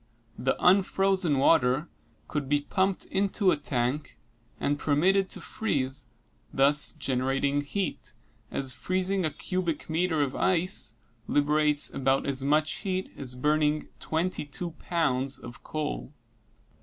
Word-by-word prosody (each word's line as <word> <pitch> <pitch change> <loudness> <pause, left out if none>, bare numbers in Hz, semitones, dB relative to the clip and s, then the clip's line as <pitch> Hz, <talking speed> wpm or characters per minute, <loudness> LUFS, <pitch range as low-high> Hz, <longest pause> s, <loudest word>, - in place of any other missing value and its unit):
The 135 - 0
unfrozen 190 -3 +3
water 135 +1 +3 0.4
could 145 -3 -3
be 145 0 +2
pumped 190 +5 0
into 195 0 +1
a - - +3
tank 140 0 -2 0.4
and 145 0 0
permitted 185 +7 +2
to - - -6
freeze, 135 - -2 0.4
thus 140 +2 +4
generating 135 +2 0
heat, 180 - -4 0.3
as 135 -2 -1
freezing 185 +4 -1
a - - +2
cubic 165 0 -3
meter 160 -2 +1
of 135 -1 -3
ice 180 - +1 0.3
liberates 150 0 +2
about 135 0 +1
as 135 -1 -1
much 150 +2 +2
heat 190 -1 -3
as 125 -2 -2
burning 150 +3 +1
twenty 165 +2 -1
two 160 +4 -5
pounds 140 -6 0
of 120 - -11
coal. 150 - -4
150 Hz, 125 wpm, -28 LUFS, 135-180 Hz, 0.4 s, thus